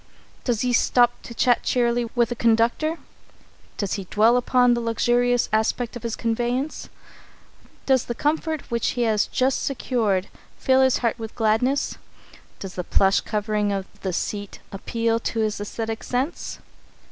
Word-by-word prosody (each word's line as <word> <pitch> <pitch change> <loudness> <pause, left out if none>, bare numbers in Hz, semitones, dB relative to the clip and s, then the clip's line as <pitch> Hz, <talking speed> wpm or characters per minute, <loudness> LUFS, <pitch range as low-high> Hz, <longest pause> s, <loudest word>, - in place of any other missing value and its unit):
Does 240 -4 0
he 250 -1 +1
stop 240 +1 +3
to 235 - -10
chat 245 0 +3
cheerily 240 -1 +1
with 240 -1 +2
the 240 - -3
conductor? 235 +8 +2 0.8
Does 200 -3 -2
he 195 - -4
dwell 220 +5 +3
upon 245 0 +3
the 235 - -1
luxurious 240 +1 +2
aspect 220 +2 0
of 240 - -6
his 230 0 -3
conveyance? 240 +5 -2 1.0
Does 265 -3 +3
the 240 - -4
comfort 310 +1 -1
which 235 -1 0
he 240 - +2
has 215 -2 +2
just 260 +1 0
secured 225 -8 0 0.3
fill 260 0 +3
his 260 -1 +4
heart 230 +1 0
with 225 -1 -7
gladness? 230 +5 +1 0.6
Does 195 -2 -7
the 180 - -4
plush 195 +2 +3
covering 210 -1 -1
of 195 -1 -2 0.2
the 190 - -2
seat 205 +3 -4
appeal 230 +3 -1
to 230 -1 -2
his 215 -1 0
æsthetic 220 +2 -4
sense? 260 +7 -3
235 Hz, 155 wpm, -23 LUFS, 215-245 Hz, 1.0 s, his